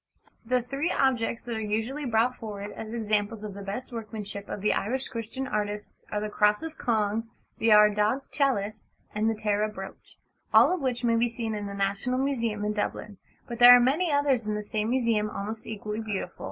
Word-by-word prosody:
The 250 +1 +1
three 275 +7 -2
objects 240 -3 +1
that 235 -1 -4
are - - -2
usually 225 +7 -2
brought 240 +1 +2
forward 205 -2 -6
as 220 0 -7
examples 215 -1 -1
of 210 -2 -5
the 200 - -8
best 205 +6 -5
workmanship 215 -3 -6
of 205 - -5
the 210 - +2
Irish 260 +5 -1
Christian 230 +3 -5
artists 210 -3 -4
are 210 - 0
the 215 - -2
Cross 210 +3 +2
of 320 -1 -6
Cong, 225 -3 0 0.3
the 225 - +2
Ardagh 210 +4 +5
Chalice, 220 -8 0 0.3
and 215 +1 +1
the 225 - 0
Tara 210 0 0
Brooch, 195 -2 -10 0.3
all - - +6
of 365 - -2
which 250 -2 -1
may 230 -1 +3
be 240 +1 +2
seen 230 -1 -4
in 205 -1 -4
the 200 - -6
National 200 +6 -1
Museum 235 -6 -1
in 210 - 0
Dublin: 205 -1 -4 0.3
but 235 -1 -6
there 245 0 +11
are - - +6
many 300 +8 +2
others 285 -4 +2
in 210 - 0
the 210 - -3
same 215 +1 -2
museum 230 -4 +1
almost 215 +2 -5
equally 215 0 -4
beautiful. 205 -5 -4
220 Hz, 200 wpm, -27 LUFS, 210-245 Hz, 0.3 s, there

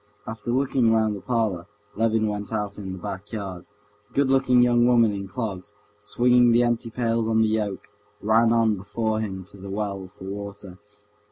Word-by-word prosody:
After 110 +1 -7
looking 130 -2 +2
round 110 -1 +2
the 100 - -8
parlor, 110 -8 -1 0.3
Levin 110 0 +1
went 105 -1 -4
out 105 -2 -3
in 95 -2 -6
the - - -7
back 95 +3 -7
yard. 95 -5 -6 0.4
The - - -28
good 140 -1 +2
looking 130 -2 +4
young 120 0 +4
woman 115 -3 +4
in 100 -1 -5
clogs, 105 -3 -5 0.2
swinging 120 +3 +3
the 120 +1 +4
empty 120 -1 0
pails 115 -1 0
on 110 0 +3
the - - +2
yoke, 105 -3 -2 0.3
ran 115 +2 +3
on 115 -2 +3
before 110 +3 -2
him 95 -4 -4
to 100 +2 -13
the 100 +1 -9
well 100 -1 -3
for 95 - -15
water. 100 -1 -7
110 Hz, 185 wpm, -24 LUFS, 100-115 Hz, 0.4 s, looking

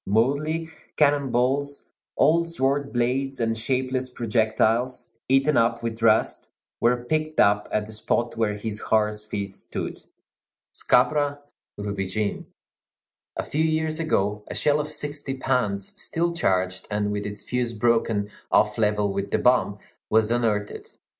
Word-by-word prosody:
Mouldy 145 +10 +1 0.3
cannon 145 -2 +3
balls, 135 +4 0 0.3
old 170 +2 +4
sword 140 -3 0
blades, 130 +3 0
and 115 -1 0
shapeless 130 +2 -1
projectiles, 115 +1 +1 0.2
eaten 135 +3 +3
up 115 0 +2
with 115 -1 -4
rust, 110 -1 +2 0.3
were 120 +1 +2
picked 155 +2 -1
up 105 0 +4
at 105 - 0
the 110 - -9
spot 120 +2 -1
where 110 -2 0
his 105 0 -4
horse's 105 -1 +1
feet 100 -2 -4
stood. 95 - -6 0.7
Scabra 145 -1 +2 0.4
rubigine. 100 0 -3 0.9
A - - -2
few 155 +2 -1
years 160 0 0
ago, 105 -10 0
a - - -6
shell 150 0 +2
of 150 - -2
sixty 145 -2 -4
pounds, 115 -7 -1
still 170 +1 -1
charged, 95 - 0
and 105 0 -1
with 105 0 -3
its 105 0 -7
fuse 125 -1 -1
broken 115 -2 +1 0.2
off 105 +1 +3
level 105 -2 +1
with 100 0 -3
the - - +1
bomb, 125 -5 +3 0.3
was 110 0 +3
unearthed. 110 -4 -1
120 Hz, 140 wpm, -25 LUFS, 105-140 Hz, 0.9 s, old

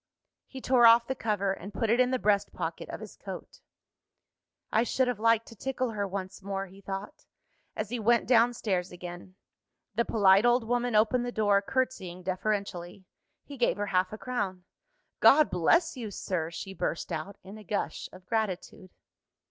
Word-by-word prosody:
_ - - -63 0.4
He 265 - -9
tore 250 -2 +5
off 230 +1 +7
the 265 - -2
cover, 205 -5 -1
and 195 +1 -9
put 225 +2 0
it 235 - +3
in 250 0 +4
the 260 - +1
breast 205 -3 +1
pocket - - -5
of - - -6
his - - -10
coat. - - -9 1.1
"I 220 - +3
should 255 +2 +1
have 245 -4 -2
liked 230 0 +3
to 230 - -12
tickle 255 +2 -2
her 205 -2 -2
once 190 0 -6
more," 195 0 -3
he 195 +1 -15
thought, 200 +9 -7 0.5
as 215 -1 -3
he 245 - -2
went 235 +2 +3
down 240 0 +4
stairs 185 -5 -2
again. 175 +1 -9 0.6
The 235 +3 +1
polite 200 -3 +4
old 240 0 +4
woman 245 0 0
opened 225 +3 +3
the 245 - -3
door, 205 -3 +3
curtsying 200 -7 -2
deferentially. 190 -1 -3 0.4
He 285 - -10
gave 240 - +1
her 205 - -1
half 185 0 +2
a 215 - -6
crown. 200 -7 -3 0.6
"God 300 +2 +6
bless 325 - +3
you, 235 -4 -5
sir!" 180 -4 -3
she 190 +3 -7
burst 170 - -3
out, 185 +6 -5
in 195 +3 -10
a - - -12
gush 205 +2 -3
of 185 0 -14
gratitude. 195 -3 -3
210 Hz, 185 wpm, -29 LUFS, 190-240 Hz, 1.1 s, off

